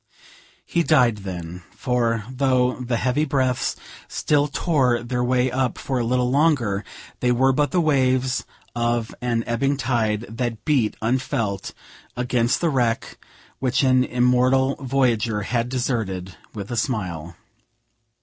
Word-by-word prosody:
He 170 Hz, -, +1 dB
died 125 Hz, -9 st, +3 dB
then; 90 Hz, -3 st, -7 dB
for, 115 Hz, -3 st, 0 dB
though 130 Hz, -1 st, +1 dB
the 125 Hz, -1 st, -1 dB
heavy 125 Hz, +5 st, +1 dB
breaths 130 Hz, -4 st, 0 dB, 0.3 s
still 145 Hz, -1 st, +1 dB
tore 135 Hz, -6 st, +1 dB
their 125 Hz, +1 st, -1 dB
way 125 Hz, +1 st, +2 dB
up 130 Hz, -2 st, -1 dB
for 130 Hz, -2 st, -2 dB
a -, -, 0 dB
little 125 Hz, +1 st, +1 dB
longer, 130 Hz, -9 st, +2 dB, 0.4 s
they 125 Hz, -, +2 dB
were 130 Hz, +2 st, +3 dB
but 145 Hz, +2 st, +1 dB
the 180 Hz, -, +1 dB
waves 130 Hz, -4 st, +2 dB, 0.3 s
of 120 Hz, -1 st, 0 dB
an 120 Hz, -2 st, 0 dB
ebbing 135 Hz, +4 st, 0 dB
tide 115 Hz, -4 st, 0 dB
that 115 Hz, -1 st, -4 dB
beat 130 Hz, -8 st, +1 dB
unfelt 115 Hz, -, -1 dB, 0.4 s
against 125 Hz, -1 st, +1 dB
the 170 Hz, -, +2 dB
wreck, 120 Hz, -4 st, -1 dB, 0.4 s
which 130 Hz, +1 st, +1 dB
an 130 Hz, -1 st, +4 dB
immortal 125 Hz, +2 st, +2 dB
voyager 120 Hz, -5 st, +1 dB
had 115 Hz, +3 st, -1 dB
deserted 110 Hz, -8 st, -2 dB, 0.2 s
with 100 Hz, -1 st, -7 dB
a 120 Hz, -, -2 dB
smile. 90 Hz, -, -3 dB
125 Hz, 135 wpm, -23 LUFS, 115-130 Hz, 0.4 s, an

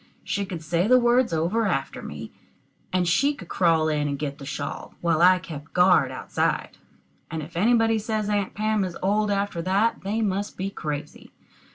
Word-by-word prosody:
She 200 Hz, -1 st, -2 dB
could 175 Hz, -4 st, -6 dB
say 170 Hz, +4 st, +1 dB
the 255 Hz, +2 st, +6 dB
words 240 Hz, -2 st, +3 dB
over 175 Hz, +8 st, +1 dB
after 135 Hz, -7 st, -2 dB
me, -, -, -8 dB, 0.6 s
and 180 Hz, -1 st, +1 dB
she 275 Hz, +13 st, +2 dB
could 180 Hz, -9 st, -12 dB
crawl 165 Hz, -3 st, +2 dB
in 150 Hz, -1 st, 0 dB
and 140 Hz, -1 st, -2 dB
get 140 Hz, 0 st, -4 dB
the 140 Hz, -, -8 dB
shawl, 140 Hz, 0 st, -5 dB
while 170 Hz, -2 st, +1 dB
I 185 Hz, +1 st, +7 dB
kept 155 Hz, -4 st, -9 dB
guard 180 Hz, -7 st, +5 dB
outside: 125 Hz, -3 st, -2 dB, 0.5 s
and 160 Hz, -1 st, -4 dB
if 165 Hz, +3 st, -11 dB
anybody 225 Hz, +3 st, +3 dB
says 215 Hz, -1 st, -2 dB
Aunt 205 Hz, -2 st, -1 dB
Pam 215 Hz, -1 st, +1 dB
is 180 Hz, -2 st, -4 dB
old 210 Hz, +2 st, +2 dB
after 200 Hz, -3 st, -1 dB
that, 195 Hz, +6 st, +1 dB
they 215 Hz, +3 st, -1 dB
must 200 Hz, 0 st, -2 dB
be 195 Hz, +1 st, -3 dB
crazy. 150 Hz, -3 st, -6 dB
185 Hz, 185 wpm, -25 LUFS, 160-210 Hz, 0.6 s, I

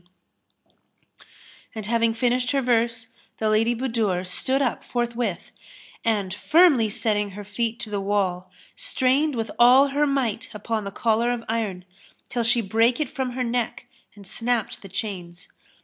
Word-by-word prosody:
''[FN#301] 175 Hz, -, -32 dB, 1.7 s
And 215 Hz, -2 st, -5 dB
having 230 Hz, +1 st, +2 dB
finished 245 Hz, +1 st, +1 dB
her 275 Hz, -, +2 dB
verse, 230 Hz, -2 st, +1 dB, 0.3 s
the 215 Hz, -1 st, 0 dB
Lady 225 Hz, +3 st, +2 dB
Budur 225 Hz, -7 st, -1 dB
stood 260 Hz, +9 st, 0 dB
up 265 Hz, -4 st, -1 dB
forthwith 235 Hz, -6 st, -3 dB, 0.5 s
and, 205 Hz, -5 st, 0 dB
firmly 290 Hz, -, +4 dB
setting 210 Hz, -1 st, 0 dB
her 205 Hz, -, -6 dB
feet 225 Hz, +3 st, -3 dB
to 220 Hz, -3 st, -5 dB
the 200 Hz, -1 st, -1 dB
wall, 190 Hz, -2 st, -1 dB, 0.3 s
strained 290 Hz, -, +1 dB
with 225 Hz, -1 st, -3 dB
all 255 Hz, +4 st, +7 dB
her 290 Hz, +2 st, +1 dB
might 245 Hz, -6 st, -1 dB
upon 215 Hz, 0 st, -3 dB
the 200 Hz, -, -4 dB
collar 230 Hz, +3 st, +1 dB
of 240 Hz, -1 st, -3 dB
iron, 210 Hz, -5 st, -2 dB, 0.4 s
till 240 Hz, -, -1 dB
she 235 Hz, +1 st, +3 dB
brake 225 Hz, +5 st, +2 dB
it 300 Hz, -4 st, -2 dB
from 260 Hz, -2 st, -3 dB
her 255 Hz, 0 st, -2 dB
neck 240 Hz, 0 st, -2 dB, 0.3 s
and 200 Hz, -1 st, -13 dB
snapped 230 Hz, +2 st, -2 dB
the 195 Hz, -, -11 dB
chains. 180 Hz, -3 st, -6 dB
230 Hz, 155 wpm, -24 LUFS, 205-245 Hz, 1.7 s, all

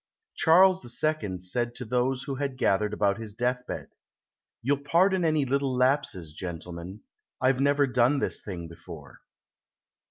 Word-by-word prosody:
Charles 185 Hz, +3 st, +5 dB, 0.2 s
II 155 Hz, -12 st, 0 dB
said 120 Hz, +7 st, -2 dB
to 125 Hz, -, -6 dB
those 125 Hz, +3 st, 0 dB
who 140 Hz, -, -4 dB
had 135 Hz, -1 st, -3 dB
gathered 105 Hz, -3 st, +1 dB
about 100 Hz, -1 st, +1 dB
his 110 Hz, -2 st, -8 dB
deathbed: 125 Hz, +1 st, -2 dB, 0.7 s
"You'll 140 Hz, +3 st, +1 dB
pardon 180 Hz, +5 st, +3 dB
any 155 Hz, -3 st, +2 dB
little 135 Hz, 0 st, 0 dB
lapses, 125 Hz, -, 0 dB
gentlemen. 90 Hz, +3 st, -7 dB, 0.4 s
I've 130 Hz, 0 st, +2 dB
never 140 Hz, +1 st, +3 dB
done 130 Hz, +2 st, +2 dB
this 140 Hz, -, -1 dB
thing 85 Hz, -4 st, -6 dB
before." 80 Hz, -4 st, -12 dB
125 Hz, 135 wpm, -27 LUFS, 100-140 Hz, 0.7 s, Charles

